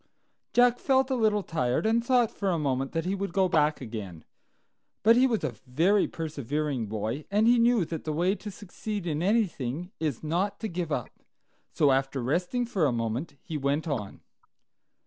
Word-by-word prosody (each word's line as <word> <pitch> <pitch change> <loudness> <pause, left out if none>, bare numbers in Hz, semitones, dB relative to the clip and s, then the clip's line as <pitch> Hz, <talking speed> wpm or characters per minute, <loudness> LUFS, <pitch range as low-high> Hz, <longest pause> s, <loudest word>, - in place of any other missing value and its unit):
Jack 245 0 +4
felt 265 0 +2
a - - +2
little 215 -4 +2
tired, 125 - -1
and 230 +1 +2
thought 245 -2 +3
for 200 - -2
a 175 - +1
moment 135 -3 -1
that 165 0 -2
he 185 - 0
would 200 0 -3
go 190 -2 +3
back 155 -3 +2
again; 105 -9 -7 0.8
but 225 +3 +7
he 255 +2 +5
was 230 -4 -1
a 120 - -1
very 175 +10 +3
persevering 145 -5 -3
boy, 110 +7 -3
and 210 +2 +2
he 240 +1 +5
knew 235 -5 +4
that 160 -1 -5
the 155 - -3
way 175 +5 +1
to 210 0 -7
succeed 205 0 -6
in 155 -2 -1
anything 180 - 0
is 150 -5 -2
not 175 +6 -1
to 220 - -3
give 175 -4 -4
up. - - -2 0.6
So, 145 -3 +3
after 135 +1 0
resting 180 - 0
for 195 -10 +1
a - - +1
moment, 120 +6 -3
he 160 - -4
went 140 +4 0
on. 115 -10 -4
165 Hz, 185 wpm, -28 LUFS, 140-210 Hz, 0.8 s, but